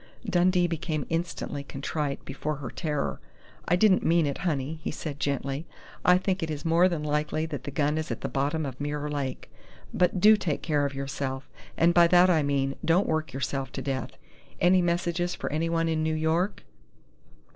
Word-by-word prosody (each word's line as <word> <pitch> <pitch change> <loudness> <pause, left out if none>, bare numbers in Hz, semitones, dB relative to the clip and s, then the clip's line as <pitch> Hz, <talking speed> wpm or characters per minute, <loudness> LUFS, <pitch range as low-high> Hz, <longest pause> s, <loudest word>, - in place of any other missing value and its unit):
Dundee 180 -1 +3
became 160 -3 -2
instantly 165 -3 -3
contrite 140 +1 -4
before 150 +3 -3
her 140 -4 -7
terror. 150 -4 -2 0.5
"I 175 - +4
didn't 190 0 +4
mean 170 -1 +3
it, 140 -1 -2
honey," 155 -3 -2
he - - -3
said 150 -1 -5
gently. 140 +2 -2 0.4
"I 180 0 +6
think 185 0 -1
it 165 - -2
is 150 0 -5
more 170 +3 +4
than 165 -4 -3
likely 150 +1 -1
that 145 -5 -6
the - - -3
gun 145 +2 0
is 155 - -4
at - - -4
the - - -2
bottom 145 +3 -1
of 135 0 -6
Mirror 145 0 -3
Lake. 140 -3 -4 0.4
But 180 +1 +2
do 215 +4 +8
take 170 -8 -2
care 145 -3 +1
of 140 - -8
yourself, 135 0 -4 0.3
and 170 +1 +4
by 170 0 +6
that 180 +1 +6
I 160 -3 +3
mean 140 -1 0
don't 175 +4 +3
work 155 0 -1
yourself 135 +1 -3
to 135 - -4
death.... 135 -1 -3 0.4
Any 180 +1 +5
messages 175 0 0
for - - -4
anyone 165 +2 0
in 160 -1 0
New 160 0 0
York?" 160 +5 0
155 Hz, 190 wpm, -27 LUFS, 140-170 Hz, 0.5 s, do